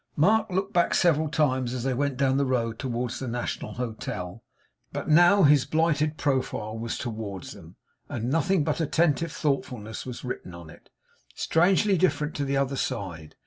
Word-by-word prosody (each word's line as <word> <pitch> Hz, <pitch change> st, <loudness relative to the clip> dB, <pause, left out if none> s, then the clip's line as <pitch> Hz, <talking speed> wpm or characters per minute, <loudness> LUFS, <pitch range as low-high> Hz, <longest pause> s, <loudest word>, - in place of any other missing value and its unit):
Mark 210 Hz, +10 st, +3 dB
looked 190 Hz, +3 st, -2 dB
back 175 Hz, -2 st, +3 dB
several 160 Hz, -3 st, +3 dB
times 130 Hz, -5 st, +1 dB
as 125 Hz, -, -3 dB
they 135 Hz, 0 st, 0 dB
went 140 Hz, 0 st, -1 dB
down 135 Hz, -1 st, +2 dB
the 140 Hz, -, +2 dB
road 115 Hz, -3 st, -1 dB
towards 120 Hz, -2 st, -3 dB
the 130 Hz, -, -4 dB
National 120 Hz, +1 st, -4 dB
Hotel, 110 Hz, -5 st, -5 dB, 0.5 s
but -, -, -5 dB
now 175 Hz, +5 st, +6 dB
his 145 Hz, -3 st, +6 dB
blighted 155 Hz, -1 st, +1 dB
profile 130 Hz, -7 st, -1 dB
was 115 Hz, +1 st, -4 dB
towards 110 Hz, -6 st, -5 dB
them, -, -, -13 dB, 0.3 s
and 115 Hz, 0 st, -3 dB
nothing 165 Hz, +2 st, +2 dB
but 155 Hz, +2 st, -1 dB
attentive 160 Hz, 0 st, +1 dB
thoughtfulness 125 Hz, -7 st, -3 dB
was 125 Hz, -2 st, -7 dB
written 125 Hz, -8 st, -6 dB
on 85 Hz, -2 st, -11 dB
it. 85 Hz, -, -18 dB, 0.5 s
Strangely 185 Hz, +3 st, +3 dB
different 155 Hz, -4 st, +1 dB
to 145 Hz, -, -2 dB
the 140 Hz, 0 st, 0 dB
other 135 Hz, 0 st, 0 dB
side! 95 Hz, -, -4 dB
135 Hz, 170 wpm, -26 LUFS, 120-160 Hz, 0.5 s, now